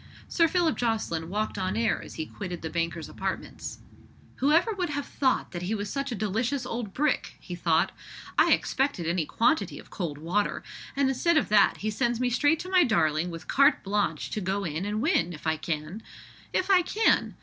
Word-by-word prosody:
Sir 335 -1 +3
Philip 340 -1 +1
Jocelyn 215 -9 -1
walked 210 +1 -2
on 190 +2 -1
air 230 0 +1
as - - -10
he 160 - -3
quitted 180 -1 -7
the 160 - -4
banker's 170 -1 -2
apartments. - - -5 0.6
"Who 280 +3 +2
ever 345 +8 +4
would 365 -4 -2
have 285 -1 -2
thought 260 -2 0
that 175 - -5
he 190 +5 -1
was 205 -1 -4
such 275 -1 -2
a - - -1
delicious 225 +6 -1
old 230 -4 -4
brick?" 295 +6 0
he 180 - -8
thought. 165 -2 +2 0.4
"I - - +4
expected 265 - +1
any 170 -2 0
quantity 315 +7 +1
of - - -13
cold 165 -7 -4
water; 175 +7 -1 0.3
and 280 -1 +2
instead 290 +6 +2
of - - +1
that, 205 -1 +5
he 215 +1 -1
sends 240 +2 0
me 250 -1 +1
straight 290 +6 +3
to 365 - -7
my 365 -2 +6
darling 165 - +2
with 165 -1 -8
carte 280 +2 +4
blanche 205 +1 -1
to 215 - -2
go 195 +2 -1
in 165 +1 -3
and 210 +2 -2
win, 180 - +2
if 150 - -11
I 160 0 +2
can. 155 +5 -4 0.5
If 375 +2 +1
I 370 -2 +7
can! 430 +5 +2
215 Hz, 205 wpm, -27 LUFS, 175-280 Hz, 0.6 s, I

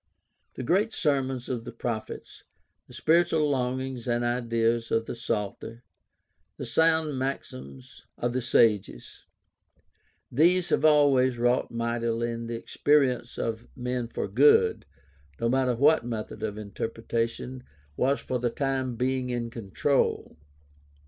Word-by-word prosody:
The - - -5
great 195 - +1
sermons 135 -4 0
of 120 -3 -3
the 120 - -7
prophets, 115 -1 -6 0.4
the - - -15
spiritual 160 +2 +3
longings 130 -2 -2
and 120 0 0
ideals 115 -1 0
of 115 0 +1
the - - -5
Psalter, 115 0 -4 0.7
the - - -5
sound 160 -4 +2
maxims 70 - -6
of 120 0 -1
the 130 - -1
sages 115 -4 +1 0.5
— - - -30
^these 175 +6 +3
have - - +2
always 140 -5 +4
wrought 120 +1 +1
mightily 115 0 -1
in 115 0 -5
the 115 - -4
experience 130 -1 +1
of 115 0 -3
men 125 -2 -3
for 115 - -4
good, 125 - +4 0.5
no 115 - 0
matter 130 0 +2
what 145 +5 +4
method 110 -2 -5
of 105 -1 -3
interpretation 115 +4 -4 0.3
was 135 - +1
for 125 - -3
the 120 0 0
time 130 -1 -2
being 130 +1 -1
in 120 -1 -3
control. 115 - -1
120 Hz, 130 wpm, -27 LUFS, 115-135 Hz, 0.7 s, always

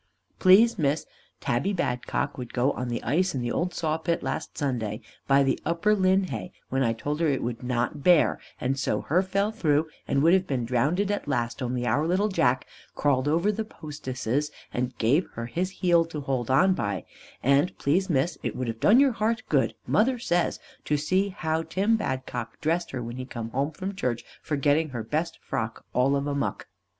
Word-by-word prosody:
Please 210 +4 +6
Miss, 145 0 +1 0.3
Tabby 140 +12 0
Badcock 125 -8 -1
would 125 -2 -7
go 130 +3 +2
on 125 -2 -4
the 120 -1 -3
ice 170 +6 +1
in 130 - -1
the 120 0 -2
old 180 +1 0
saw 160 -1 -1
pit 170 +1 -1
last - - -4
Sunday, 115 -7 -2 0.3
by 140 0 +5
the 135 -1 +1
upper 170 +6 +2
linhay 190 -1 +1 0.2
when 135 +1 0
I 115 -3 +3
told 145 +6 -3
her 165 - +2
it 135 -3 0
would 120 -1 -3
not 125 +4 -1
bear, 175 -3 +5 0.2
and 135 +2 -1
so - - 0
her 175 +5 +2
fell 195 +2 0
through 160 -7 +1 0.2
and 140 +1 +2
would 165 +2 +6
have 190 0 +3
been 125 -4 -1
drownded 150 - +1
at 205 - -3
last, 120 -2 -1
only 125 0 -1
our 145 +5 +1
little 190 +5 +2
Jack 130 -9 +2 0.3
crawled 140 -2 +1
over 170 +7 +2
the 220 +2 -2
postesses 145 - -3 0.2
and 125 0 -2
give 140 +10 +2
her 115 - -4
his 175 +10 -2
heel 175 -3 +3
to 155 -3 -6
hold 130 -4 -2
on 180 +9 +5
by, 100 - -2 0.4
and 140 +7 +3
please 185 +7 +1
Miss 155 +2 +1
it - - -3
would 130 - -3
have 115 0 -5
done 220 - +6
your 275 -1 +5
heart 230 +1 -1
good, - - +2
mother 250 +4 +2
says, 175 -7 0 0.3
to 150 - +1
see 185 +7 +1
how 160 -4 -1
Tim 200 +7 +1
Badcock 130 - -4
dressed 170 +3 0
her 130 -2 -4
when 120 +1 -6
he 130 - -5
come 115 -3 -6
home 135 +4 0
from 190 +5 -5
church 120 -9 -2 0.2
for 155 - -2
getting 145 +3 +2
her 120 -4 -4
best 155 +8 -2
frock - - -4
all 130 +3 +3
of 140 0 -1
a 145 - -1
muck. 140 - -2
150 Hz, 200 wpm, -26 LUFS, 125-185 Hz, 0.4 s, Please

